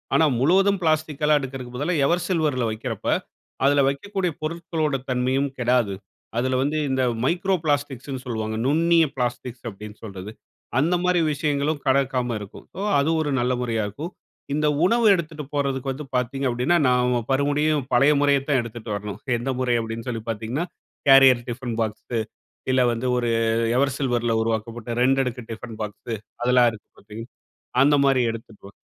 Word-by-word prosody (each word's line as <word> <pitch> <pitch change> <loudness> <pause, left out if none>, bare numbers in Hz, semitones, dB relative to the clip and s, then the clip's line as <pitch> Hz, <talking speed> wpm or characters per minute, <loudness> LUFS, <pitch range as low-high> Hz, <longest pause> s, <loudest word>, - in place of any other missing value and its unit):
ஆனா, 160 - +5
முழுவதும் 195 +7 +3
பிளாஸ்டிக்கல்லாம் 155 -1 +2
எடுக்கறதுக்கு 130 -2 -7
பதிலா 165 +5 0
எவர் 175 0 +1
சில்வர்ல 150 -9 +1
வைக்கிறப்ப, 110 -1 -5 0.6
அதுல 140 0 +4
வைக்கக்கூடிய 185 +5 -2
பொருட்களோட 160 -2 -2
தன்மையும் 130 +2 +1
கெடாது. 120 -5 +2 0.4
அதுல 130 +1 +1
வந்து 150 +2 -1
இந்த 130 -1 +1 0.2
மைக்ரோ 180 +6 +1
பிளாஸ்டிக்ஸ்ன்னு 140 -3 -2
சொல்லுவாங்க. 110 -3 -3
'நுண்ணிய 165 +3 +4
பிளாஸ்டிக்ஸ்' 125 0 -3
அப்டீன்ன்னு 105 +1 -11
சொல்றது. 100 0 -7 0.5
அந்த 170 +5 +2
மாரி 180 -1 +3
விஷயங்களும் 145 0 0
கடக்காம 130 -3 +1
இருக்கும். 100 -1 -11
ஓ - - -2 0.2
அது 140 - +1
ஒரு 150 - -1
நல்ல 125 +1 +1
முறையா 115 -3 -1
இருக்கும். 150 - -6 0.4
இந்த 150 +1 +1 0.2
உணவு 230 +3 +3
எடுத்துட்டு 155 -3 -5
போறதுக்கு 135 -2 -1
வந்து 140 +3 -6
பார்த்தீங்க 125 +2 -1
அப்படீன்னா, 125 +8 +2
நாம 125 -1 +2
மறுபடியும் 145 +2 +2
பழைய 140 +5 +5
முறையைத் 140 -1 +2
தான் 140 -3 +3
எடுத்துட்டு 115 -1 -7
வரணும். 105 0 -6 0.2
எந்த 120 +3 -4
முறை? 125 -2 +1
அப்டீன்னு 115 +2 -6
சொல்லி 115 -2 -3
பார்த்தீங்கன்னா, 115 +9 -2 0.4
கேரியர் 135 -3 +7
டிஃபன் 120 -1 -4
பாக்ஸு, 110 +2 -3 0.5
இல்ல 130 0 +4
வந்து 120 +2 -3
ஒரு 120 -1 0 0.5
எவர் 140 0 +2
சில்வர்ல 120 -4 0
உருவாக்கப்பட்ட 115 +1 -3
ரெண்டடுக்கு 130 -2 +1
டிஃபன் 115 0 -8
பாக்ஸு, 110 +2 -5 0.3
அதெல்லாம் 125 0 +5
இருக்கு 110 - -13
பார்த்தீங்க, 105 +2 -9 0.6
அந்த 145 +1 +5
மாரி 135 -2 +3
எடுத்துக்கலாம். 110 -3 -11
130 Hz, 150 wpm, -23 LUFS, 120-150 Hz, 0.6 s, கேரியர்